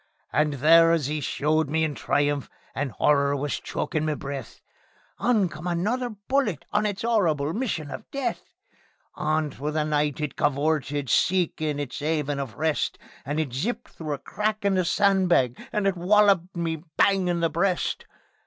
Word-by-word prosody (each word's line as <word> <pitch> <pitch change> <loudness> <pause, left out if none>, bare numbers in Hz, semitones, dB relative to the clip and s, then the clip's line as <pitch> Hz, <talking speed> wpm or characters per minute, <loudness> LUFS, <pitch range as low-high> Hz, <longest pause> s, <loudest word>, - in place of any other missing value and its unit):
And 150 0 +2
there 165 +4 +6
as 150 -4 0
'e 155 - -1
showed 155 +2 0
me 160 +2 +1
in 155 -2 0
triumph, 145 0 0 0.2
and 140 -2 -2
'orror 140 -1 +3
was 145 +1 -2
chokin' 155 -2 -2
me 155 -1 0
breath, 140 -4 -7 0.6
On 220 -6 +3
came 155 +2 -7
another 215 +9 0
bullet 210 - -1
on 210 +1 +2
its 205 0 -4
'orrible 165 -10 +1
mission 195 - -2
of 220 - -8
death; 275 -2 -2 0.7
On 155 -1 0
through 150 +3 -4
the 155 0 +1
night 150 -1 0
it 150 -2 -3
cavorted, 145 -1 0
seekin' 155 -3 +1
its 145 +1 -5
'aven 150 -2 -1
of 130 -7 -5
rest, 155 0 0 0.3
And 145 +3 -2
it 145 -6 -2
zipped 230 - -3
through 155 -2 -5
a - - -3
crack 215 +8 -2
in 200 - +3
the 185 -1 +1
sandbags, 180 - +2
and 210 -1 0
it 195 -1 +2
wolloped 190 0 +3
me 165 -1 -1 0.2
bang 195 -2 +3
on 170 -1 0
the 165 - +1
breast. 180 +1 0
160 Hz, 170 wpm, -25 LUFS, 145-195 Hz, 0.7 s, there